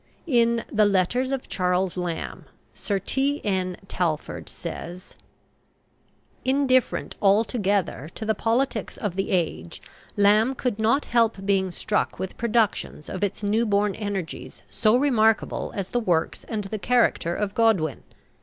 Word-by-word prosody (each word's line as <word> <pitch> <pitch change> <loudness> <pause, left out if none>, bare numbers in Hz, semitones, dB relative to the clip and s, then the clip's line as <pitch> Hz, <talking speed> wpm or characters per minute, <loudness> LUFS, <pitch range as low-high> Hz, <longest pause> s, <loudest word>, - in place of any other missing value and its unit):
In 235 -6 +2
"The 215 -1 +4
Letters 205 +7 +1
of 270 -2 -3
Charles 180 0 0
Lamb," 175 -2 -4 0.3
Sir 200 - -2
T.N. 200 -7 -1
Talfourd 165 -5 -2
says: 175 +2 -8 1.3
"Indifferent 260 -2 +1
altogether 200 - +1
to 220 - -5
the 220 - +2
politics 230 0 -1
of 205 -5 -3
the 195 - -1
age, 160 - -1 0.4
Lamb 210 +5 +4
could 245 -5 -2
not 230 +7 +2
help 225 -4 +1
being 195 -1 +2
struck 205 +4 -1
with 190 - -5
productions 225 -9 0
of 185 - -4
its 205 +1 -2
newborn 205 -1 +2
energies 200 -5 -5
so 220 +2 +3
remarkable 225 -5 +2
as 195 -2 -3
the 245 - 0
works 175 -8 0
and 215 -2 -3
the 205 +2 -5
character 215 -6 +2
of 205 -1 -2
Godwin. 205 - +2
205 Hz, 130 wpm, -25 LUFS, 185-230 Hz, 1.3 s, The